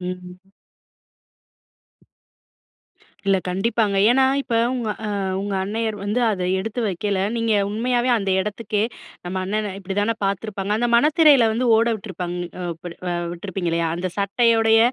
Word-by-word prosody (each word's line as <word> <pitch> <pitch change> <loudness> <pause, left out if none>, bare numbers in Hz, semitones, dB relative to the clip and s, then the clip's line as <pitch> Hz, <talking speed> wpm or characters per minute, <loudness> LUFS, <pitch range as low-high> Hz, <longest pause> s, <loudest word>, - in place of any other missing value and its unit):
ம். 180 0 -6 2.9
இல்ல 195 -1 +4
கண்டிப்பாங்க. 200 +2 0
ஏன்னா, 265 +1 +4 0.2
இப்போ 235 -4 -2 0.2
உங்க 240 -4 -2 0.2
அ - - -2 0.3
உங்க 200 0 -3
அன்னையர் 220 +2 -2
வந்து, 210 +5 0
அதை 185 -3 -2
எடுத்து 225 +5 -3
வைக்கல, 195 +1 -1 0.2
நீங்க 230 -1 +1 0.2
உண்மையாவே 245 +3 0
அந்த 195 -3 -1
எடத்துக்கே, 210 +1 -2 0.4
நம்ம 180 +2 -4
அண்ணன, 210 +1 -2
"இப்படி 195 0 -5
தானே 225 +2 +1
பாத்திருப்பாங்க." 200 0 -2
அந்த 240 +1 0
மனத்திரையில 295 -4 +5
வந்து 245 +3 0
ஓட 230 +1 +3
விட்ருப்பாங்க 180 -4 -6 0.4
இப்டி 170 +2 -9
இல்ல 180 +1 -8
அ - - -3
விட்ருப்பீங்க 175 -1 -4
இல்லையா? 165 0 0
அந்த 180 +1 -3
சட்டையோடைய, 225 +2 +3
205 Hz, 135 wpm, -22 LUFS, 190-230 Hz, 2.9 s, மனத்திரையில